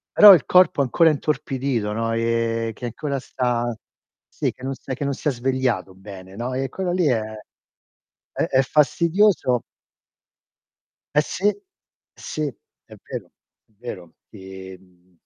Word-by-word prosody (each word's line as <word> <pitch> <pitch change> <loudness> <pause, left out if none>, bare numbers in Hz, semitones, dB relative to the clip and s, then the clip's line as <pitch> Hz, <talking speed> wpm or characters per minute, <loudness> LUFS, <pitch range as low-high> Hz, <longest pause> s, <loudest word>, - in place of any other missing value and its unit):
Però 210 -1 +11
il 155 - -1
corpo 180 -5 +4
è - - +4
ancora 160 +6 +4
intorpidito, 135 -6 -1
no, 115 +1 -1
e 115 0 0
che 125 - -7
ancora 140 +4 -3
sta 120 -2 -1 0.5
sì, - - -2
che - - -21
non 135 +1 -3
s'è 130 - -7
che 140 +2 -4
non 140 - 0
si 145 - -5
è - - +4
svegliato 125 -7 -1
bene, 95 -1 -11
no, 120 +4 -4
e 135 +1 -2
quello 185 +5 -3
lì 175 -2 +2
è 120 -5 +2 1.1
e - - 0
è 130 - +3
fastidioso 160 - +2 1.5
Eh 150 - +6
sì! 200 +7 0 0.6
Sì, 155 - -6 0.4
è - - -13
vero, - - -5 0.4
è - - -38
vero. 90 -9 -8 0.2
Ti, 95 -1 -10
mhmm 90 -1 -27
125 Hz, 150 wpm, -22 LUFS, 115-145 Hz, 1.5 s, Però